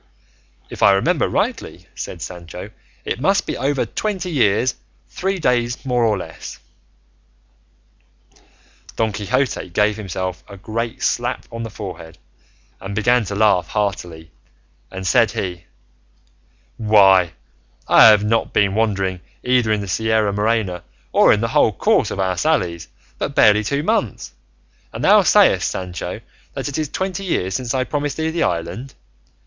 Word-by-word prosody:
"If - - -8
I 100 - +6
remember 95 - +1
rightly," - - -3
said 85 - -7
Sancho, 85 -2 -8 0.3
"it - - -3
must - - +2
be - - -3
over 135 0 0
twenty 185 - -3
years, 125 -2 +2 0.4
three 195 +1 -2
days 125 -5 0
more 125 -2 +1
or 110 -3 +2
less." 90 - -8 2.4
Don 110 -1 0
Quixote 115 +2 -1
gave 105 +4 +1
himself 95 -3 -5
a 100 - -10
great 115 +4 -4
slap - - -1
on 115 - -6
the 115 - -5
forehead 90 -6 -9 0.6
and 95 +1 -7
began 120 +2 +2
to 100 - -5
laugh 105 -3 +3
heartily, 85 -6 -3 0.6
and 95 0 -7
said 90 - +3
he, 90 -2 -4 1.1
"Why, 95 -5 +4 0.5
I - - +8
have 105 -2 +6
not 115 +2 0
been 100 -1 +2
wandering, 100 -4 0 0.2
either 125 -3 +2
in 105 -1 +1
the 100 - -6
Sierra 110 +1 +1
Morena 105 -3 0 0.3
or - - +5
in 105 - +2
the 115 - -1
whole 110 - +3
course 90 - +2
of - - -5
our 95 -1 0
sallies, 90 - 0 0.3
but - - -3
barely 105 0 +5
two 140 +8 -1
months, 120 - -1 0.6
and - - -6
thou - - +6
sayest, - - +4
Sancho, 90 -3 -5 0.3
that - - -3
it 145 +1 -3
is 155 -2 -2
twenty 190 +1 -3
years 95 - -1
since 125 +3 -2
I 130 - +1
promised 145 +2 -3
thee 160 0 -1
the 165 - -2
island. 90 +10 -3
105 Hz, 150 wpm, -20 LUFS, 95-125 Hz, 2.4 s, I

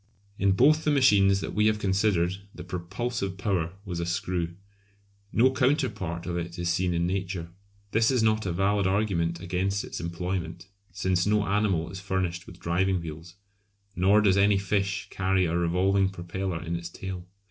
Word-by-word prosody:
In 100 0 +3
both 150 +9 +4
the - - +1
machines 100 -9 +4
that - - -4
we 105 +1 +3
have 110 0 +2
considered 95 -3 +1 0.2
the 90 - -8
propulsive 95 +3 -4
power 95 -5 -1
was 90 -3 -4
a 85 - -1
screw. 90 -1 -2 0.8
No 130 +3 +4
counterpart 130 - 0
of 85 -1 -2
it 85 0 -5
is 85 0 -1
seen 90 0 +1
in 85 0 +1
Nature. 90 -2 -3 0.4
This 115 +1 +3
is 125 -4 +2
not 110 -2 +2
a - - 0
valid 100 +2 +1
argument 95 -4 0
against 95 +3 -1
its - - -6
employment, 85 0 -4 0.2
since 95 0 0
no 105 0 +2
animal 100 -5 0
is 95 - -7
furnished 95 -3 -2
with 85 - -12
driving 90 +2 +1
wheels, 85 +1 -8 0.6
nor 100 +4 +4
does 100 -2 +3
any 100 0 +4
fish 100 0 -1
carry 95 -1 +1
a 85 0 -1
revolving 95 +3 +2
propeller 90 -1 -4
in 85 +1 -3
its 85 0 -5
tail. 95 0 -7
95 Hz, 170 wpm, -27 LUFS, 85-100 Hz, 0.8 s, both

